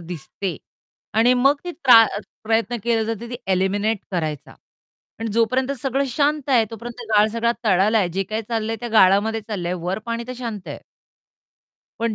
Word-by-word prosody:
दिसते 170 +1 -6 0.6
आणि 240 +3 +4
मग 275 +4 +3
ती 355 - -4
त्रा 240 -9 +7 0.4
प्रयत्न 225 +1 0
केले 230 -2 +1
जाते 225 +1 -4
ती 245 - -4 0.2
एलिमिनेट 200 +3 +1
करायचा. 155 -5 -3 0.7
आणि 225 - -2
जोपर्यंत 255 +4 +1
सगळं 270 +1 0
शांत 290 +2 0
आहे 240 -4 +5
तोपर्यंत 235 +2 -8
गाळ 210 +1 +5
सगळा 235 0 +1
तळाला 210 +2 +3
आहे. 185 - +1
जे 190 +3 -2
काही 215 +3 -3
चाललंय 225 -1 -2
त्या 240 - -4
गाळामध्ये 215 +2 +4
चाललंय. 200 -5 -4
वर 180 +4 -3
पाणी 230 0 -3
तर - - -3
शांत 225 -6 -6
आहे. - - -7 1.2
पण 230 -1 0
225 Hz, 165 wpm, -22 LUFS, 195-240 Hz, 1.2 s, त्रा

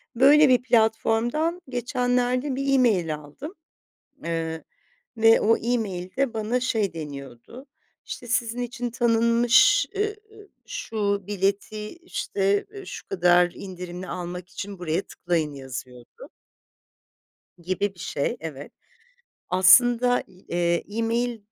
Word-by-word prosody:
böyle 285 +3 +6
bir 250 -1 +4
platformdan 240 +8 +1
geçenlerde 250 +2 0
bir 275 0 0
email 190 -12 +2
aldım. 150 - -10 0.7
Eee, 165 -1 -3 0.5
ve 225 0 +5
o 225 +2 +4
email 210 -6 -3
de 270 -3 0
bana 225 +3 -1
şey 220 -8 0
deniyordu 140 - -9 0.4
"işte 240 - -7
sizin 240 0 0
için 245 0 -4
tanınmış, 235 - +4
ııı, 420 +1 -1 0.5
şu 200 -3 -2
bileti 205 +2 -2
işte 200 - -1 0.2
şu - - -8
kadar 175 -1 +4
indirimli 180 -1 -8
almak 180 0 -6
için 195 +2 -7
buraya 175 +1 -1
tıklayın" 165 -4 -2
yazıyordu. 130 -2 -9 1.3
Gibi 190 +3 -2
bir - - -23
şey 140 - -2
evet. 150 -3 -8 0.8
Aslında, 240 +7 +5
eee, 175 -2 -2
email 235 +1 0
215 Hz, 105 wpm, -25 LUFS, 175-245 Hz, 1.3 s, böyle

